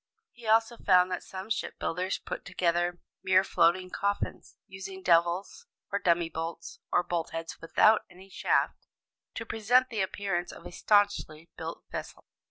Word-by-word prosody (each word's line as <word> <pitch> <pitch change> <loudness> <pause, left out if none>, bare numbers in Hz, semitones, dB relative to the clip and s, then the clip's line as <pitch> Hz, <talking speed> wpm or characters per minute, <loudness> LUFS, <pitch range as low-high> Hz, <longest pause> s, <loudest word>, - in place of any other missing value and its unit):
'" 450 0 -51
He 235 -2 -12
also 225 +2 +3
found 185 -3 +4
that 180 - -2
some 190 +3 -8
ship - - -2
builders 180 +3 -2
put - - -6
together 175 -1 0 0.2
mere 190 0 +4
floating 185 0 +2
coffins, 200 0 -3
using 190 0 -9
"devils," 175 - +2 0.2
or 200 - 0
dummy 170 -2 +2
bolts, 165 +1 -6
or 175 - +3
bolt 170 -2 -2
heads 165 0 -6
without 215 +6 +4
any 185 +2 -15
shaft, 195 - 0 0.5
to 230 - -4
present 245 +4 +3
the 220 -4 -2
appearance 190 -2 -2
of - - -13
a - - -7
staunchly 175 -6 +1
built 165 +1 -6
vessel. - - -7
185 Hz, 160 wpm, -29 LUFS, 175-205 Hz, 0.5 s, found